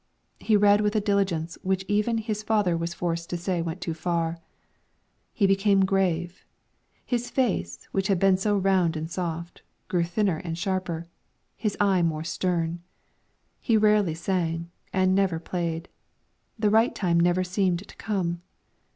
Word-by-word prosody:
He 215 -2 +3
read 205 0 +5
with 210 +1 0
a - - +4
diligence 195 -6 0
which 190 0 -1
even 210 +3 +1
his 215 -1 -3
father 210 -5 +1
was 170 +1 -3
forced 170 -1 -3
to 175 - -2
say 175 0 -1
went 165 +2 -4
too 170 - -2
far. 165 0 -2 0.9
He 205 - +1
became 195 0 +3
grave; 180 -2 0 0.6
his 245 -1 -1
face, 195 - -1
which 195 0 0
had 195 -3 +2
been 195 +1 +4
so 205 +2 +1
round 185 -4 +2
and 160 +2 -5
soft, 170 -1 -4 0.3
grew 175 -2 +2
thinner 175 0 0
and 165 -1 -5
sharper, 180 -3 -2 0.5
his 210 -3 -2
eye 195 -3 +3
more 160 -2 0
stern; 170 0 -1 0.8
he 230 -3 +2
rarely 210 -6 +3
sang, 170 -1 -2 0.2
and 185 -1 +2
never 190 -3 +2
played; 170 0 -3 0.7
the 210 -2 +2
right 225 +3 +3
time 170 -4 +1
never 175 +2 +3
seemed 185 0 0
to - - -14
come. 175 -5 -2
185 Hz, 155 wpm, -26 LUFS, 170-205 Hz, 0.9 s, read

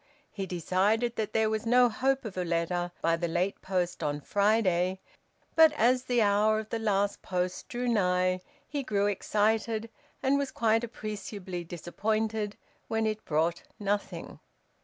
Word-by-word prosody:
He 195 -2 -4
decided 200 +7 +1
that 215 -1 -2
there 220 0 +2
was 220 +1 -2
no 245 +1 +6
hope 265 +3 0
of 210 - -6
a 180 - -1
letter 175 +1 -1
by 165 0 +3
the 170 +1 -1
last 175 +4 -1
post 180 -2 -1
on 145 0 -1
Friday, 190 -1 +2 0.6
but 320 -1 +8
as 250 -1 +3
the 245 -2 +3
hour 210 +1 +3
of 215 0 -4
the 230 - -2
last 205 -2 0
post 180 0 -2
drew 245 +1 -3
nigh 185 -4 +2 0.3
he 290 -1 -2
grew 205 -6 0
excited, 215 +2 0 0.3
and 275 +1 +3
was 280 -1 -1
quite 225 0 +2
appreciably 205 -5 -5
disappointed 210 +5 -2 0.3
when 225 0 0
it 215 0 -2
brought 165 +2 +1 0.2
nothing. 205 0 -3
210 Hz, 155 wpm, -29 LUFS, 180-225 Hz, 0.6 s, but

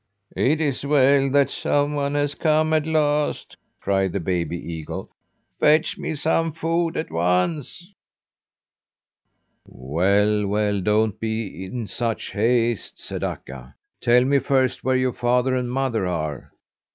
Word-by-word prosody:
"It 150 +4 +2
is 145 -5 -1
well 140 -1 +4
that 140 0 +3
some 145 0 0
one 145 0 -1
has 145 0 0
come 155 0 +1
at 155 0 +1
last," 150 -2 0 0.2
cried 95 -2 0
the 100 - -1
baby 85 -1 -2
eagle. 80 -2 -7 0.5
"Fetch 155 +1 +3
me 155 - -3
some 160 +2 0
food 165 +1 -1
at 160 - -4
once!" 90 - -1 1.7
"Well, 100 - +1
well, 105 0 0
don't 105 +1 +1
be 110 -4 -4
in 115 +4 -5
such 115 +3 -3
haste," 115 +1 0
said - - -6
Akka. 65 -1 -7 0.3
"Tell 125 +1 +4
me 140 +1 +3
first 130 -1 0
where 130 0 +2
your 130 -1 0
father 125 +1 +1
and 125 -1 -2
mother 125 -7 -1
are." 75 -6 -4
125 Hz, 135 wpm, -23 LUFS, 100-145 Hz, 1.7 s, well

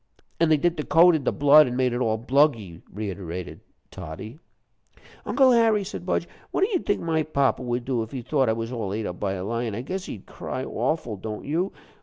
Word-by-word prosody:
"And 165 -1 +3
they 155 - +6
dipped 175 +3 0
the 150 - -2
coat 170 +3 +6
in 150 -4 -1
the - - +2
blood, 145 +1 +6
an' 125 - -3
made 125 -1 +1
it 120 - -2
all 110 -2 +1
bluggy," 115 - +1
reiterated 90 -4 -6 0.3
Toddie. 95 - -8 0.9
"Uncle 265 -2 +4
Harry," 225 -3 +4
said 195 - -7
Budge, - - 0 0.2
"what - - -2
do 390 - +3
you 370 - +2
think 205 - -1
my 160 -1 0
papa 140 -4 +1
would 120 -1 -2
do 125 -3 0
if 110 - -5
he 130 -1 -6
thought 135 -1 +1
I - - +3
was 115 +1 -4
all 110 -6 -3
ate 110 0 -3
up 90 - -5
by 95 -2 -1
a 95 -1 -4
lion? 115 0 -2
I 115 - -3
guess 185 +8 -5
he'd 100 - -8
cry 130 - -5
awful, 120 -2 -2
don't 105 +2 -6
you? 170 +7 -1
125 Hz, 225 wpm, -25 LUFS, 110-155 Hz, 0.9 s, they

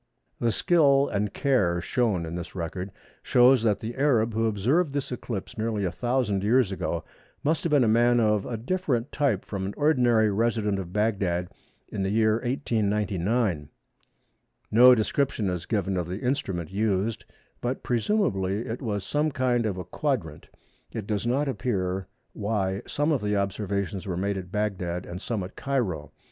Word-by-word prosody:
The 115 - +2
skill 140 0 +4
and 105 0 -1
care 105 -12 +1
shown 100 -2 0
in 80 - -6
this 90 +1 -6
record 90 +2 -4 0.3
shows 125 0 +5
that 110 -3 +1
the 110 +2 -4
Arab 120 -5 +2
who 115 +1 +1
observed 135 - +1
this 140 -2 -3
eclipse 115 -5 -5
nearly 110 -2 -1
a 90 - -1
thousand 120 -2 0
years 115 -1 +3
ago 95 - -2 0.4
must 155 +2 +1
have 170 - 0
been 145 -4 +4
a - - +3
man 120 +2 +4
of 105 -3 +2
a 115 - -3
different 130 -2 -1
type 135 -10 0
from 100 -2 -4
an 100 +2 -4
ordinary 120 -8 +3
resident 105 -1 0
at 90 -2 -6
Bagdad 95 -4 0 0.4
in 100 - -4
the 95 - 0
year 110 +1 +3
1899. 105 - 0 1.0
No 125 +3 +8
description 110 -3 0
is 90 -1 -4
given 100 -3 0
of 90 -2 -2
the 95 +4 -5
instrument 95 - -2
used, 105 +1 0 0.4
but 125 +2 -2
presumably 115 - 0
it 120 0 -5
was 105 -6 -2
some 150 +1 0
kind 125 -4 +1
of 100 -3 -3
a 90 - -4
quadrant. 120 - -3 0.4
It 110 - -5
does 105 +2 -2
not 140 +4 +1
appear 95 -8 -2 0.3
why 100 -2 -1
some 145 +2 0
of 140 -7 +1
the 105 0 0
observations 100 0 -2
were 90 -2 -2
made 100 +1 -1
at 90 -1 -10
Bagdad 95 -4 -2
and 90 +2 -7
some 110 -4 -2
at 90 - -9
Cairo. 95 - -2
110 Hz, 170 wpm, -26 LUFS, 95-125 Hz, 1.0 s, No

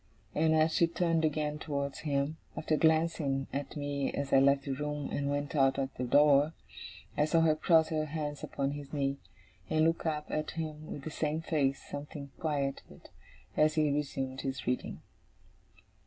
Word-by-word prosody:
And, 160 +1 +3
as 160 0 +3
she 170 - +4
turned 165 -1 +1
again 150 -1 0
towards 140 -3 -3
him, 145 +1 -1 0.2
after 155 0 +1
glancing 160 -4 +2
at 140 +1 -4
me 145 -1 -1
as 140 -1 -3
I 135 - +8
left 140 0 +4
the 140 - -2
room 150 +1 -3
and 140 0 -1
went 145 +1 -2
out 135 -2 +4
at 135 0 -2
the 125 - -4
door, 145 +3 +5 0.6
I 150 - +3
saw 165 +1 +3
her 160 -1 +4
cross 160 0 +4
her 155 -2 0
hands 150 -1 -4
upon 140 0 -2
his 145 -1 -7
knee, 140 -1 0 0.5
and 155 0 +3
look 165 0 +1
up 150 -1 -1
at 155 0 -1
him 155 -1 -5
with 140 - -6
the 160 - -5
same 155 +1 -1
face, 140 -4 0
something 145 -1 -7
quieted, 140 -4 -3 0.4
as 155 +1 +3
he 155 -2 +3
resumed 135 -2 -2
his 135 -1 -4
reading. 125 +1 -2
150 Hz, 175 wpm, -31 LUFS, 140-155 Hz, 0.6 s, I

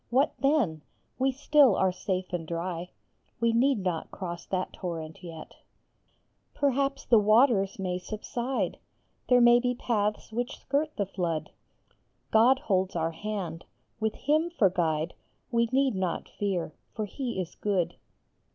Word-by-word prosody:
What 270 +5 +3
then? 265 - +2 0.4
We 265 +1 +3
still 280 -3 +5
are 190 -1 +2
safe 185 0 -3
and 165 -2 -3
dry; 170 +1 -3 0.5
We 230 0 +2
need 260 +3 +3
not 175 -3 -2
cross 175 -2 -6
that 185 -1 -2
torrent 170 0 -6
yet! 165 -2 -9 1.0
Perhaps 275 0 0
the 230 -3 +6
waters 215 -2 +4
may 185 -2 -2
subside; 235 +6 -3 0.5
There 250 -1 +6
may 240 0 +7
be 250 0 0
paths 215 -3 -1
which 240 +3 -3
skirt 295 +2 -1
the 200 - +1
flood. 175 -4 -3 0.8
God 235 +4 +6
holds 190 -6 0
our 165 -1 0
hand. 180 -2 -4 0.4
With 220 -1 -1
him 310 +4 +1
for 215 - +3
guide 165 -2 0 0.4
We 235 -1 +3
need 270 -1 +3
not 185 -3 -2
fear; 185 -6 -2 0.2
for 215 - -2
he 240 0 -4
is 180 -2 -4
good. 195 -5 0
210 Hz, 140 wpm, -28 LUFS, 180-250 Hz, 1.0 s, may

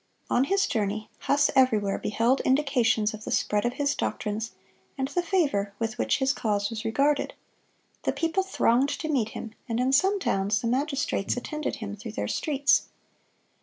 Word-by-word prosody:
(135) - - +1
On 245 - +4
his 395 - +3
journey, 215 -2 -2
Huss 285 +1 +2
everywhere 215 -7 +3
beheld 230 +5 +1
indications 245 -6 +2
of 215 0 -8
the - - -6
spread 210 +1 +1
of 240 - 0
his 285 0 0
doctrines, 215 -4 -3 0.4
and 265 0 -1
the 355 - 0
favor 290 - 0
with 230 +2 -3
which - - +2
his 270 0 +2
cause 205 -4 -1
was 225 0 -5
regarded. 280 +6 +1 0.7
The - - 0
people 330 +3 0
thronged 275 -8 +2
to 315 - -3
meet 250 -8 +1
him, 225 - -6 0.2
and 230 +1 -1
in 255 +2 +1
some 385 +7 +3
towns 200 - +1
the 235 - -1
magistrates 275 -4 0
attended 300 +4 -3
him 205 -2 -6
through 210 +1 -8
their 105 - -2
streets. 285 - +2
245 Hz, 175 wpm, -27 LUFS, 215-285 Hz, 0.7 s, On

